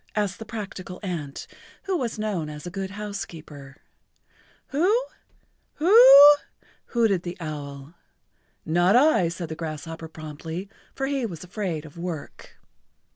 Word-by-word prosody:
asked 205 -1 -1
the 225 - -7
practical 195 -4 -7
ant, 160 -7 -5 0.4
who 390 -1 -1
was 240 -8 -2
known 200 -8 -2
as 150 +1 -9
a 175 - -6
good 190 +1 -4
housekeeper. 165 -9 -8 0.9
[Pg 280 - -2
81]"Who? 440 +8 +3 0.7
Who 355 +7 +3
oo?" 295 - +10 0.5
hooted 220 -7 +2
the 175 0 -6
owl. 145 -2 -7 0.7
"Not 175 +5 +3
I," 255 - +5
said 170 -1 -6
the 160 - -5
grasshopper 160 0 -6
promptly, 160 +4 -7 0.3
for 270 - -2
he 275 -1 -1
was 170 -5 -8
afraid 180 -4 -4
of 155 +2 -12
work. 170 -4 -7
180 Hz, 135 wpm, -25 LUFS, 160-220 Hz, 0.9 s, oo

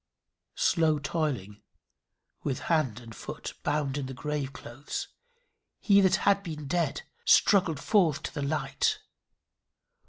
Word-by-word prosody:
Slow 165 - +3
toiling, 140 - -3 0.8
with 135 -3 -2
hand 130 -8 +1
and 115 -2 -11
foot - - -7
bound 145 -1 -1
in 135 - -4
the 130 - -7
grave 150 0 -3
clothes, 130 +1 -6 0.7
he 200 -1 +5
that 190 -1 +4
had 200 0 +4
been 155 -6 -6
dead 165 0 -1 0.2
struggled 180 -7 +4
forth 165 -9 +2
to - - -5
the 145 - -3
light. 145 +2 0
150 Hz, 125 wpm, -28 LUFS, 135-170 Hz, 0.8 s, he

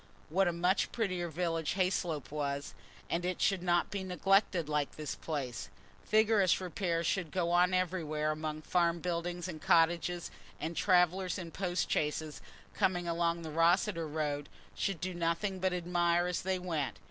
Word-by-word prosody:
What 190 +4 +3
a - - +2
much 180 +3 +1
prettier 185 -6 -1
village 165 0 -1
Hayslope 180 -6 -1
was! 140 -1 -3 0.3
And 170 +1 -1
it 180 0 -2
should 195 -3 +2
not 175 -1 +1
be 200 -2 -3
neglected 190 -2 +2
like 150 -2 -1
this 155 -1 -4
place: 125 -10 -4 0.4
vigorous 215 -4 +4
repairs 175 -2 -1
should 180 -1 0
go 170 +1 0
on 180 +1 +4
everywhere 165 -5 0
among 155 0 -4
farm 170 0 +2
buildings 175 +1 -3
and 160 -4 -7
cottages, 170 +1 +2 0.3
and 165 +1 -3
travellers 180 +1 +3
in 170 -3 -6
post 180 -1 -1
chaises, 150 0 -1 0.3
coming 175 -2 +1
along 170 0 0
the 160 - -6
Rosseter 165 +2 +2
road, 145 -2 -2 0.2
should 195 -4 -2
do 185 +2 -3
nothing 175 +3 -1
but 185 0 +1
admire 175 -1 +1
as 180 -1 -1
they 190 0 0
went. 160 - -2
175 Hz, 160 wpm, -32 LUFS, 160-185 Hz, 0.4 s, vigorous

